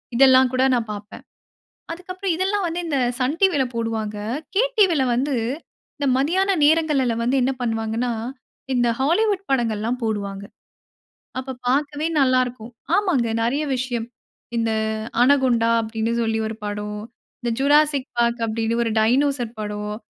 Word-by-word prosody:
இதெல்லாம் 260 Hz, 0 st, +6 dB
கூட 255 Hz, +1 st, +2 dB
நான் 225 Hz, -3 st, -2 dB
பார்ப்பேன். 205 Hz, 0 st, -10 dB, 0.7 s
அதுக்கப்புறம் 365 Hz, +1 st, -4 dB
இதெல்லாம் 385 Hz, +2 st, 0 dB
வந்து 340 Hz, +1 st, -3 dB
இந்த 295 Hz, -4 st, -1 dB, 0.2 s
சன் 280 Hz, +6 st, 0 dB
டிவில 345 Hz, -9 st, +3 dB
போடுவாங்க. 220 Hz, -2 st, -2 dB, 0.4 s
கே 445 Hz, -, +5 dB, 0.2 s
டிவில 340 Hz, -9 st, +4 dB
வந்து 270 Hz, +3 st, 0 dB, 0.6 s
இந்த 285 Hz, -, -1 dB
மதியான 365 Hz, +9 st, +1 dB
நேரங்கள்லல 295 Hz, -6 st, +3 dB
வந்து 250 Hz, +3 st, +1 dB
என்ன 265 Hz, +2 st, +1 dB
பண்ணுவாங்கன்னா, 225 Hz, +1 st, -1 dB, 0.6 s
இந்த 240 Hz, -1 st, +2 dB
ஹாலிவுட் 395 Hz, +7 st, +1 dB
படங்கள்லாம் 235 Hz, -1 st, 0 dB
போடுவாங்க. 200 Hz, -2 st, -3 dB, 0.9 s
அப்ப 260 Hz, 0 st, -5 dB
பார்க்கவே 290 Hz, +3 st, 0 dB
நல்லா 255 Hz, -1 st, +4 dB
இருக்கும். 240 Hz, -1 st, -9 dB, 0.2 s
ஆமாங்க 320 Hz, -, +1 dB
நெறைய 275 Hz, +7 st, 0 dB
விஷயம். 245 Hz, -2 st, -3 dB, 0.5 s
இந்த 230 Hz, 0 st, 0 dB, 0.5 s
"அனகுண்டா" 250 Hz, -4 st, +3 dB
அப்டின்னு 225 Hz, +1 st, -2 dB
சொல்லி 225 Hz, 0 st, 0 dB
ஒரு 220 Hz, -, -6 dB
படம், 210 Hz, 0 st, -4 dB, 0.4 s
இந்த 240 Hz, -2 st, -2 dB
"ஜுராசிக் 290 Hz, -1 st, +3 dB
பார்க்" 235 Hz, 0 st, +1 dB
அப்படின்னு 225 Hz, +1 st, -1 dB
ஒரு 225 Hz, -, -1 dB
டைனோசர் 245 Hz, 0 st, +1 dB
படம், 210 Hz, 0 st, -4 dB
250 Hz, 130 wpm, -22 LUFS, 225-290 Hz, 0.9 s, இதெல்லாம்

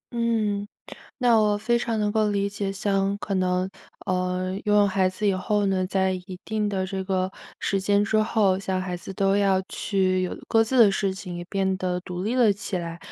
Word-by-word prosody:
嗯， 215 Hz, -3 st, 0 dB, 0.5 s
那 245 Hz, -2 st, +4 dB
我 210 Hz, -1 st, +2 dB
非 235 Hz, +3 st, +1 dB
常 230 Hz, -2 st, -1 dB
能 210 Hz, 0 st, +1 dB
够 215 Hz, -1 st, +1 dB
理 200 Hz, 0 st, 0 dB
解， 200 Hz, -1 st, -3 dB
像 195 Hz, 0 st, 0 dB
可 200 Hz, -, -3 dB
能， 185 Hz, 0 st, +1 dB, 0.4 s
呃， 185 Hz, +1 st, -1 dB
拥 210 Hz, -, +2 dB
有 205 Hz, -1 st, +5 dB
孩 190 Hz, -1 st, +2 dB
子 185 Hz, +3 st, -2 dB
以 195 Hz, -, +2 dB
后 205 Hz, +2 st, 0 dB
呢， 190 Hz, -1 st, +1 dB
在 190 Hz, 0 st, +1 dB
一 180 Hz, 0 st, -7 dB
定 215 Hz, -1 st, -1 dB
的 190 Hz, -2 st, -1 dB
这 190 Hz, 0 st, -4 dB
个 185 Hz, -1 st, 0 dB, 0.3 s
时 195 Hz, -, 0 dB
间 200 Hz, +1 st, +2 dB
之 210 Hz, +1 st, 0 dB
后， 215 Hz, -3 st, +2 dB
小 190 Hz, -1 st, -2 dB
孩 180 Hz, -1 st, -3 dB
子 190 Hz, -, -8 dB
都 195 Hz, +1 st, +2 dB
要 195 Hz, -2 st, +3 dB
去 185 Hz, -2 st, 0 dB
有 185 Hz, -, -2 dB
各 225 Hz, 0 st, +4 dB
自 255 Hz, +3 st, 0 dB
的 215 Hz, -4 st, +8 dB
事 195 Hz, 0 st, 0 dB
情， 185 Hz, -2 st, -7 dB
也 175 Hz, -, -6 dB
变 190 Hz, -1 st, 0 dB
得 180 Hz, -1 st, -2 dB
独 180 Hz, 0 st, -6 dB
立 220 Hz, +5 st, -1 dB
了 240 Hz, -4 st, +5 dB
起 195 Hz, -2 st, -3 dB
来， 170 Hz, -1 st, -6 dB
195 Hz, 230 characters per minute, -25 LUFS, 185-210 Hz, 0.5 s, 的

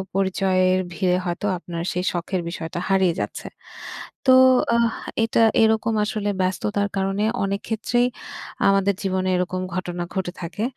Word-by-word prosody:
পরিচয়ের 185 Hz, -1 st, +2 dB
ভিড়ে 180 Hz, +2 st, +1 dB
হয়তো 175 Hz, +3 st, -3 dB
আপনার 170 Hz, -1 st, -6 dB
সেই 180 Hz, +1 st, -1 dB
শখের 175 Hz, +1 st, -2 dB
বিষয়টা 165 Hz, 0 st, -5 dB
হারিয়ে 190 Hz, -3 st, +3 dB
যাচ্ছে। -, -, -5 dB, 0.8 s
তো 260 Hz, -, +6 dB, 0.4 s
আহ, 235 Hz, 0 st, +3 dB, 0.3 s
এটা 225 Hz, 0 st, +2 dB, 0.2 s
এরকম 220 Hz, 0 st, +2 dB
আসলে 210 Hz, -1 st, -2 dB
ব্যস্ততার 200 Hz, +2 st, 0 dB
কারণে 195 Hz, +2 st, 0 dB, 0.2 s
অনেক 200 Hz, +1 st, -1 dB
ক্ষেত্রেই 240 Hz, +2 st, +1 dB, 0.6 s
আমাদের 195 Hz, 0 st, +3 dB
জীবনে 185 Hz, -1 st, -1 dB
এরকম 185 Hz, +1 st, -2 dB
ঘটনা 175 Hz, -1 st, -3 dB
ঘটে 185 Hz, -2 st, -2 dB
থাকে। 175 Hz, +6 st, -4 dB
190 Hz, 135 wpm, -23 LUFS, 180-205 Hz, 0.8 s, তো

